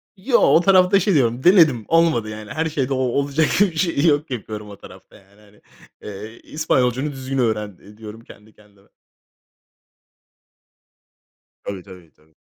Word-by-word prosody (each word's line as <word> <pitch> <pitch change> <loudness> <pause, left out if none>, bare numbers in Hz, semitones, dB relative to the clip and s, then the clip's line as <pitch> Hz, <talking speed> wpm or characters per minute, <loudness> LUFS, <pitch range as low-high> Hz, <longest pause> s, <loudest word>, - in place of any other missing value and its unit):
Yo, 235 +6 +1
o 165 - +4
tarafta 190 +1 +4
şey 200 0 0
diyorum, 125 -4 0
denedim. 160 - +4
Olmadı, 165 -10 +1
yani. 110 +1 -9
Her 160 +2 -2
şeyde 140 -4 -2
o - - -2
olacak 140 +4 0
gibi 205 -3 +3
bir - - -16
şey 165 -4 0
yok, 150 -2 +1
yapıyorum 105 -3 -7
o 100 - -12
tarafta, - - -16
yani, 100 +2 -22
hani. 105 0 -23 0.4
Eee, 105 +3 -9
İspanyolcanı 135 -2 -1
düzgün 135 0 -6
öğren, 105 -5 -2
eee, 105 +1 -17
diyorum, 110 0 -11
kendi 110 -1 -17
kendime. 100 -1 -25 2.8
Tabii, 95 -3 -7
tabii, 90 -4 -15
tabii. 80 +1 -30
125 Hz, 155 wpm, -20 LUFS, 105-155 Hz, 2.8 s, o